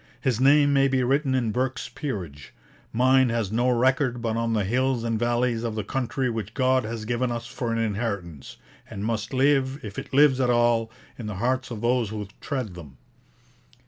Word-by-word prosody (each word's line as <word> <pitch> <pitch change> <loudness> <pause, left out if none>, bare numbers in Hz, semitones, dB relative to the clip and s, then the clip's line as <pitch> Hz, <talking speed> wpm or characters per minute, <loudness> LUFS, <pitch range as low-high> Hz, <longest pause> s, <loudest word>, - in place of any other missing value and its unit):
His 125 -4 0
name 145 +1 +5
may 135 0 +4
be 130 -1 +1
written 135 +1 +1
in 120 -4 0
Burke's 130 +3 -2
Peerage; 90 - -6 0.4
mine 130 +2 +4
has 115 -4 -1
no 120 +3 +2
record 125 +1 +2
but 115 -1 -2
on 115 0 0
the 105 -2 +1
hills 125 +3 0
and 115 -2 -1
valleys 120 0 +1
of 115 -2 -3
the 110 - -2
country 130 +3 -2
which 110 -2 -4
God 130 -1 +2
has 110 0 -5
given 120 +2 -1
us 120 0 -4
for 120 -2 -4
an 115 - 0
inheritance, 100 - -3 0.3
and 100 +1 -5
must 110 -1 -2
live, 135 0 +2
if 100 -1 -6
it - - -9
lives 140 -1 +5
at 125 - +2
all, 120 -1 +2 0.3
in 115 - -5
the 105 - -4
hearts 130 +6 -1
of 115 -4 -6
those 120 -2 +1
who 105 -2 -5
tread 130 -9 -4
them. 75 -6 -12
120 Hz, 195 wpm, -25 LUFS, 110-130 Hz, 0.4 s, name